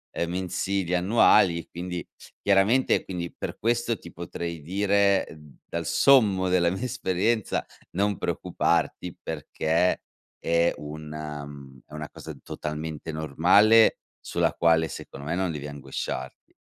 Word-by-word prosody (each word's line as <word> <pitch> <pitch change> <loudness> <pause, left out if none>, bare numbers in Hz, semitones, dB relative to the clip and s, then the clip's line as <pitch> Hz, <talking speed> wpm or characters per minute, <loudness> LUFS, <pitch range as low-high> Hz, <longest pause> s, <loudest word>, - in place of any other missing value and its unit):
uhm, 85 - -1
mensili 95 0 -2
e - - +3
annuali, 95 -2 +4
e - - -10
quindi 90 0 -5 0.4
chiaramente, 100 +6 +3
quindi, 85 -2 -5
per - - -5
questo, 120 0 0
ti 85 - -11
potrei 85 -1 -5
dire 100 +3 +2
d 75 -3 -14
dal 85 -1 -4
sommo 100 - +4
della 90 -1 +3
mia 95 +6 -4
esperienza, 110 -3 0 0.3
non 100 +1 0
preoccuparti, 90 -2 -1
perché, 80 +3 0 0.4
è 85 +1 +2
una 75 -1 -7
mhmm, 70 -2 -12
è 75 - -17
una 75 -1 -6
cosa - - -9
totalmente 75 +1 -5
normale, 90 +9 +5 0.2
sulla - - 0
quale, 80 -1 +3
secondo 70 +1 -9
me, 80 - -1
non 95 -2 0
devi 75 -2 -5
angosciarti. 65 -2 -6
85 Hz, 135 wpm, -26 LUFS, 75-100 Hz, 0.4 s, normale